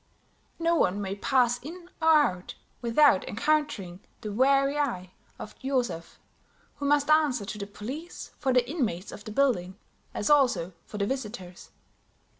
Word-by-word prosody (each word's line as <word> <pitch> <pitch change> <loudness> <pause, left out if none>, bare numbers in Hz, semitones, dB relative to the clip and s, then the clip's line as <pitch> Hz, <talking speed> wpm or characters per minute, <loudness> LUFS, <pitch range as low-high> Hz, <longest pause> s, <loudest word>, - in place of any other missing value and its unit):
No 335 0 +1
one 200 - +2
may 195 -1 -3
pass 245 +2 +2
in 340 +6 -10
or 320 - +1
out 290 - +3 0.3
without 240 -2 +4
encountering 225 -9 -1 0.2
the 215 -2 -5
wary 275 +4 +3
eye 185 -11 -2 0.3
of 215 - -9
Joseph, 250 -11 -2 0.6
who 285 - -2
must 290 +1 +3
answer 290 -8 +3
to 210 - -6
the 200 - -5
police 260 - -8
for 265 - +1
the 250 -1 +3
inmates 235 - -2
of 205 - -10
the 215 - -6
building, 210 -8 +1 0.4
as - - -2
also 245 - +3
for 210 - -7
the 200 - 0
visitors. 205 -7 -6
245 Hz, 150 wpm, -27 LUFS, 200-285 Hz, 0.6 s, without